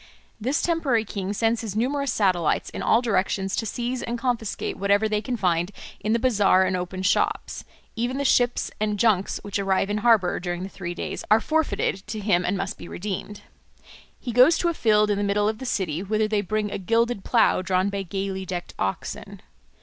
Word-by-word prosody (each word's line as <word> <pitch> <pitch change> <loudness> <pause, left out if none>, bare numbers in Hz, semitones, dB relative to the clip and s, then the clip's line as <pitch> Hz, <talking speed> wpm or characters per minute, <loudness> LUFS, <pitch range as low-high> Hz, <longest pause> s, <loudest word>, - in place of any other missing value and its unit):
This 255 +7 0
temporary 285 -10 +1
king 195 -1 -4
sends 225 +2 +1
his 215 -3 -5
numerous 275 +4 0
satellites 185 -7 +1
in - - -6
all 230 +2 +3
directions 195 -3 0
to 225 - -2
seize 245 +3 -3
and 240 0 -3
confiscate 235 -3 -2
whatever 200 +2 +2
they 210 -1 0
can 245 +1 -3
find 175 -2 +1 0.3
in 215 - -2
the 230 - +4
bazaar 205 -6 +3
and 185 0 0
open 185 +1 -4
shops; 190 - 0 0.3
even 245 +3 -1
the 280 - -1
ships 245 -2 +2
and 210 -1 0
junks 200 -3 +2
which 205 0 -3
arrive 195 0 +1
in 210 - 0
harbour 210 -5 +3
during 175 0 -4
the 190 - -5
three 175 -3 -6
days - - -5
are 215 +2 +6
forfeited 220 -9 -1
to 215 0 -4
him 195 -4 +2
and 190 +3 0
must 195 +2 -4
be - - -9
redeemed. 205 +2 -5 0.8
He 245 - -5
goes 255 +8 +6
to 345 - +1
a - - -1
field 210 -6 +3
in 200 - 0
the - - 0
middle 205 +1 +1
of 215 0 -2
the 260 - -5
city, 175 -7 -1
whither 215 +2 0
they 215 -1 +1
bring 210 +1 -2
a - - -3
gilded 230 +1 +1
plough 230 -5 +3
drawn 185 +1 +1
by 200 0 -3
gaily 195 0 -4
decked 180 -1 -5
oxen. 95 0 -4
210 Hz, 205 wpm, -24 LUFS, 190-230 Hz, 0.8 s, are